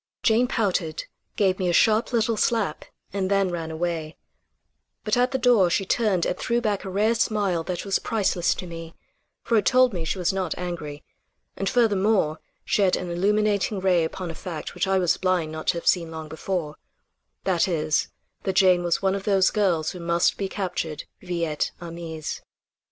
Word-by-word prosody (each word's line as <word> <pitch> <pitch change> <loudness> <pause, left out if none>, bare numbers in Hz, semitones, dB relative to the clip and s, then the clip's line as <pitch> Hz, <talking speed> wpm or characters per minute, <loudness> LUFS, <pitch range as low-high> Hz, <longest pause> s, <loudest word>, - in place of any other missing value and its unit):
Jane 235 +2 +4
pouted, 185 -9 -1 0.3
gave 190 -3 +2
me 185 -2 +1
a - - +1
sharp 220 +6 +3
little 230 -1 +1
slap 210 -7 0 0.3
and 190 -2 -1
then 195 -1 +2
ran 165 -2 -4
away, 160 -1 -3 0.9
but 215 - +1
at 250 +1 +3
the 265 - -1
door 235 -7 +4
she 195 +3 0
turned 200 -4 +1
and - - 0
threw 235 0 +1
back 210 -4 -1
a 195 - -5
rare 210 +4 +2
smile 205 -6 0
that 180 +1 -4
was 195 -1 +1
priceless 195 -5 0
to - - -6
me; 165 -1 -8 0.5
for 230 -1 +2
it 210 - +2
told 255 -2 +5
me 175 -3 -3
she 160 - -2
was 180 0 0
not 185 -4 -2
angry; 160 -5 -5 0.5
and 195 - -1
furthermore 205 -8 +2 0.3
shed 195 -3 +3
an 180 -1 -4
illuminating 205 +2 +1
ray 185 -3 +3
upon 170 +2 -4
a - - -7
fact 165 -1 -6
which - - -1
I 190 0 +2
was 180 -3 +2
blind 180 -4 0
not 155 0 -7
to - - +2
have 170 - -6
seen 170 -3 +2
long 160 -1 -7
before; 160 -1 -3 0.7
that 185 -2 +2
is, 155 -3 0 0.3
that 190 - -1
Jane 185 -2 +5
was 175 +2 0
one 190 0 +3
of 195 0 -4
those 195 -2 +3
girls 175 -7 +1
who 180 - -9
must 170 0 +2
be 195 -1 -3
captured 175 -6 -3 0.2
vi 175 -2 -2
et 150 -2 -1
armis. 165 -2 -6
185 Hz, 190 wpm, -25 LUFS, 170-205 Hz, 0.9 s, told